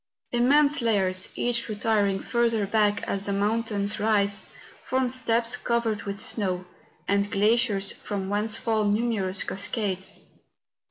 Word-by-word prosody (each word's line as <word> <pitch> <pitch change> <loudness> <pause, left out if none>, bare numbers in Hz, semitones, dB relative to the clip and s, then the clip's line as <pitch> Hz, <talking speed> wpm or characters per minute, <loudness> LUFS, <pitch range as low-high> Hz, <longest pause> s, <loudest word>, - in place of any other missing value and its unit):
Immense 280 +4 +4
layers, 190 -5 +2
each 240 -1 -1
retir¬ 210 -1 +1
ing 195 0 -2
further 230 -3 +1
back 205 0 +1
as 200 0 -3
the 200 - -1
mountains 210 0 -1
rise, 205 -2 0 0.4
form 260 -1 0
steps 235 -1 +2
covered 235 -4 -1
with 200 0 -4
snow, 185 -5 -1 0.4
and 200 0 +1
glaciers 210 -1 +2
from 200 -2 -5
whence 210 +2 +1
fall 220 -2 0
numerous 205 -3 0
cascades. 195 -1 -3
210 Hz, 125 wpm, -26 LUFS, 200-235 Hz, 0.4 s, Immense